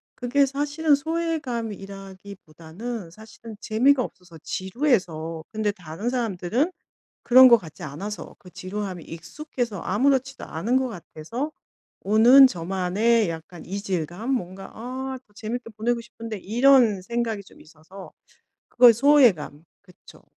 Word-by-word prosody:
그게 265 +3 +2
사실은 290 +2 +1
소외감이라기보다는 205 - -6
사실은 220 +2 -12
재미가 250 +4 +3
없어서 180 -5 -11
지루해서 185 - -1
근데 215 -2 -1
다른 180 +5 -6
사람들은 235 - -1 0.5
그런 255 +1 +8
것 235 - +8
같지 160 -6 -13
않아서 190 +9 -7
그 180 - -15
지루함에 185 -1 -6
익숙해서 235 - -6
아무렇지도 265 +5 0
않은 225 +11 -1
것 260 -1 0
같아서 225 - -6 0.5
오는 235 +7 +7
저만의 190 +4 0
약간 165 +1 -9
이질감? 190 - -4
뭔가 195 -5 -4
'아 260 +3 -5
더 205 - -30
재밌게 230 +2 -6
보내고 235 +2 0
싶은데.' 230 -2 -8
이런 235 0 +4
생각이 225 +1 -3
좀 - - -19
있어서 165 +5 -14 0.6
그거의 240 -1 +7
소외감 230 - +3 0.2
그쵸. 180 -3 -19
215 Hz, 305 characters per minute, -24 LUFS, 185-250 Hz, 0.6 s, 그런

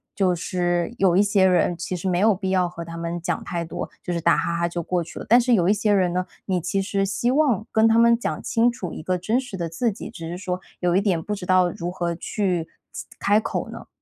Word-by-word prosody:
就 185 -3 +2
是 175 +3 -1
有 185 -3 +3
一 195 - +5
些 200 -2 +3
人， 180 -1 +3
其 175 +2 -4
实 180 +2 -4
没 175 -1 +1
有 215 +2 +5
必 190 0 -3
要 185 -2 +2
和 170 -1 -7
他 165 0 -8
们 170 +1 -4
讲 - - -2
太 170 -1 -3
多， 165 - -5
就 180 - -4
是 170 - -1
打 170 +1 +4
哈 170 - -1
哈 170 0 +1
就 170 0 -4
过 180 +1 -1
去 165 - -11
了。 - - -7
但 240 +3 +6
是 245 0 +2
有 180 -5 +3
一 205 - +5
些 210 0 +1
人 185 -3 +2
呢， 180 0 -1 0.2
你 185 -2 0
其 180 +3 -1
实 195 0 0
希 235 +5 0
望 260 -8 +2
跟 220 0 +4
他 225 - +4
们 235 0 +5
讲 - - -3
清 235 +1 +2
楚 195 -9 -6
一 - - -7
个 180 +3 -1
真 220 +7 0
实 250 -7 -7
的 170 -2 -3
自 225 +8 0
己， 200 - -8
只 165 -7 -8
是 175 - -5
说 180 -1 -3 0.2
有 175 -1 +1
一 - - +3
点 190 -5 +1
不 210 - -3
知 195 -3 -5
道 185 -1 +4
如 175 0 -5
何 175 -2 -2
去 180 -2 -2 0.2
其 - - -7
开 205 +1 +3
口 220 - -3
呢？ - - -9
185 Hz, 290 characters per minute, -23 LUFS, 175-210 Hz, 0.2 s, 但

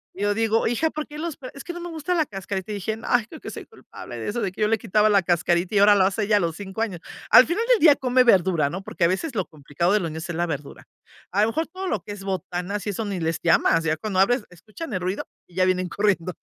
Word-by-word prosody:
Y 195 - -4
yo 205 0 +2
digo: 225 +1 +1
"Hija, 245 +8 +1
¿por 305 -1 -5
qué 300 - -10
los 330 -2 -4
pel? 255 -4 -9
Es 280 - -9
que 350 - -6
no 350 - -7
me 350 0 -6
gusta 325 +2 -2
la 320 -3 +2
cascarita", 195 -2 -5
y - - -3
dije, 210 +2 -3
ay, 245 -3 +2
creo 310 - -11
que - - -8
soy - - -8
culpable - - -11
de - - -5
eso, 235 +3 -2
de 195 -4 -1
que 185 - -9
yo 210 - +4
le 225 0 +1
quitaba 215 0 +2
la 205 -2 +4
cascarita 175 +2 +1
y - - +4
ahora 205 +1 +7
lo 195 - +4
hace 200 +3 0
ella 205 0 +3
a - - +3
los 165 -4 -1
5 200 +1 -6
años. 200 -7 -2 0.3
Al 255 - +9
final 365 +7 -1
del - - +5
día 310 -5 +7
come 255 -1 +3
verdura, 185 -9 +3
¿no? 190 +3 -5
Porque 190 - -4
a - - +6
veces 230 - -2
lo 190 -4 0
complicado 155 +4 -2
de 210 - +4
los 170 -4 -3
niños 160 +1 -6
es 175 - -4
la 175 +1 0
verdura. 145 -3 -6 0.5
A 200 - +2
lo - - +3
mejor 320 +8 -2
todo 375 +3 -6
lo 220 - -1
que 205 - -9
es 205 -1 -8
botanas 190 +1 -4
y - - +1
eso 210 +2 -3
ni 200 -3 -3
les 165 0 -1
llamas, 165 -1 +3
ya 160 -1 0
cuando 195 +2 -2
abres, 235 +5 +3
escuchan 215 - -10
el 185 - -1
ruido 185 +3 -2 0.2
y 175 - -21
ya 185 0 +3
vienen 185 0 +1
corriendo. 190 -3 0
200 Hz, 295 wpm, -24 LUFS, 180-235 Hz, 0.5 s, Al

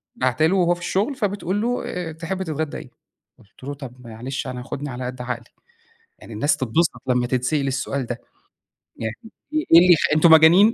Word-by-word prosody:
باعته 130 +4 +1
له 175 +4 +2
وهو 175 -1 +3
في 175 - -14
الشغل 205 +10 -1
فبتقول 205 -3 -2
له: 245 +2 -1
"آآ 175 -2 -4
تحب 175 +4 -4
تتغدّى 155 -3 -3
إيه؟" - - -10 0.5
قُلت 105 +5 -21
له: 140 +2 -4
"طَب 125 -3 -11
معلش 125 +5 -5
أنا 125 -1 -5
خُدني 145 +3 -5
على 125 0 -5
قد 125 0 -6
عقلي 125 -1 -4 0.8
يعني 115 - -11
الناس 130 +8 +1
تتبسط 130 +1 0
لمّا 125 -1 +1
تتسأل 130 +3 0
السؤال 135 0 -2
ده، 120 0 -5 0.8
يعني 110 0 -4 0.4
إيه 310 0 0
إيه 165 - +10
اللي 180 +1 +7
يخ 160 - +2 0.2
أنتم 160 +1 +5
مجانين؟! 170 +8 +7
145 Hz, 190 wpm, -22 LUFS, 125-175 Hz, 0.8 s, إيه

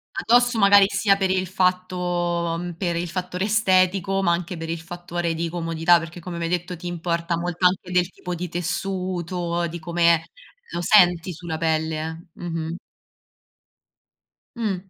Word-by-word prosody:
Addosso 240 +1 +3
magari, 200 -1 +7
sia 200 -1 +3
per 195 -1 0
il 185 0 +1
fatto 185 0 0 0.6
uhm, 175 +1 -5
per 175 -1 -2
il 170 +1 -2
fattore 180 +2 -3
estetico, 195 -2 +2
ma 170 - +3
anche 170 +1 -2
per 165 0 -5
il 165 0 -2
fattore 175 0 -4
di 170 +1 -2
comodità, 165 0 +2
perché 165 +1 -8
come 175 0 -7
mi 170 - -2
hai - - -2
detto 180 +1 -2
ti 175 +1 -8
importa 170 0 -2
molto 175 +1 +2
anche 180 0 -2
del 180 -1 +2
tipo 180 -1 -7
di 175 +1 -4
tessuto, 175 -1 -2
di 170 +1 -6
come, 170 0 +3
eh, 165 - -5 0.5
lo 175 - -3
senti 180 -2 +4
sulla 160 -1 -5
pelle 160 -1 0 0.4
eh, - - -19
mh-mh. 165 -1 -4 1.8
Mh, 215 -4 0
175 Hz, 165 wpm, -23 LUFS, 170-185 Hz, 1.8 s, magari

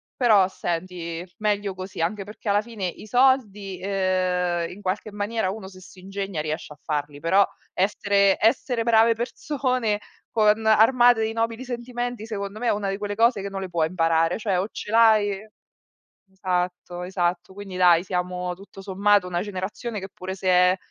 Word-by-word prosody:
però 210 -7 +4
senti 170 -1 -4
meglio 205 -2 0
così. 185 -2 -7
Anche 195 +4 -1
perché 210 +1 -7
alla 205 +1 +3
fine 215 -4 -6
i 180 +4 -6
soldi, 210 -7 +2
ehm, 185 -3 0
in 195 +3 -11
qualche 200 +2 -3
maniera 205 -1 -1
uno 195 -1 -6
se 185 -1 -14
si 185 0 -15
ingegna 195 -3 -4
riesce 155 0 -4
a 150 - -22
farli, 145 -2 -3
però 195 +4 +4 0.3
essere 200 0 +2
essere 230 +1 +2
brave 230 0 +5
persone 250 -3 -1 0.3
con 215 0 +2
armate 230 +1 +5
di 220 - -1
nobili 230 +2 -2
sentimenti 245 -2 -4
secondo 205 -1 -5
me 245 - -2
è - - +4
una 205 -1 -2
di 195 - -2
quelle 205 0 -4
cose 230 -2 +3
che 200 - -4
non 195 0 -5
le 190 - -5
puoi 165 -2 +1
imparare, 165 -1 +1
cioè 205 -4 0
o 190 +3 0
ce 210 - -7
l'hai 215 -2 +4 0.8
esatto 180 -1 -3
esatto. 180 -1 -1
Quindi 195 -1 -8
dai, 180 -1 +5
siamo 180 0 -2
tutto 195 0 -13
sommato 200 0 +2
una 175 0 -1
generazione 205 +3 -4
che 190 - -7
pure 190 +1 -6
se 190 -1 -5
è 180 +1 +5
195 Hz, 170 wpm, -24 LUFS, 180-220 Hz, 0.8 s, brave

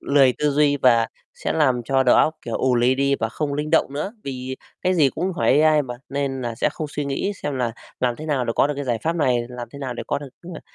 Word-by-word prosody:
Lười 135 -3 +4
tư 150 - +2
duy 145 0 +3
và 115 -4 +4 0.3
sẽ - - -3
làm 130 -6 +2
cho 135 +3 +2
đầu 125 - +5
óc, 160 - +3
kiểu, 115 - -3
ù 130 -1 +2
lì 125 +2 +3
đi, 140 +1 +2
và 115 - 0
không 145 +3 -3
linh 150 +1 -3
động 160 -4 +3
nữa. 155 +9 -3
Vì 130 -1 -5 0.3
cái 185 0 +2
gì 150 -5 +4
cũng 185 +1 -2
hỏi 150 -3 +3
AI 155 -1 +4
mà, 125 -2 -6
nên 140 -1 -2
nà 120 -2 -3
sẽ - - +1
không 155 - -4
suy 145 0 -3
nghĩ 140 +9 -1
xem 145 -2 -2
là 120 -3 -1 0.3
làm 125 -2 +1
thế 155 - -8
nào 135 -5 0
để 115 - -1
có - - +4
được 150 - -2
cái 145 - -3
giải 120 -3 0
pháp 165 +2 0
này, 130 -6 +2
làm 120 -2 -7
thế 140 - -9
nào 130 -3 -4
để - - -5
có 140 - -1
được, 145 -2 -9 0.3
ờ, - - -8
140 Hz, 280 wpm, -22 LUFS, 125-150 Hz, 0.3 s, đầu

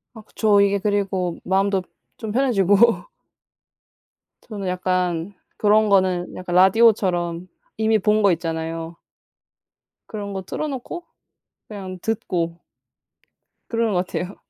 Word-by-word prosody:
아 220 - -10
그쵸. 210 -1 +2
이게 200 0 +3
그리고 195 -4 -1
마음도 195 +1 +1 0.4
좀 220 -3 -5
편해지고. 230 -3 +3 1.4
저는 205 -4 -6
약간 180 0 -1 0.2
그런 215 0 +3
거는 185 -2 +1
약간 180 -1 -4
라디오처럼 185 -3 +3 0.3
이미 220 0 +3
본 210 +2 +2
거 200 -2 +5
있잖아요. 165 0 -4 1.1
그런 205 -2 -6
거 190 - -4
틀어놓고 295 - -5 0.6
그냥 190 -3 -8
듣고 170 -6 -2 1.1
그러는 230 -2 0
것 180 0 0
같아요. 185 +2 -4
195 Hz, 235 characters per minute, -22 LUFS, 180-215 Hz, 1.4 s, 거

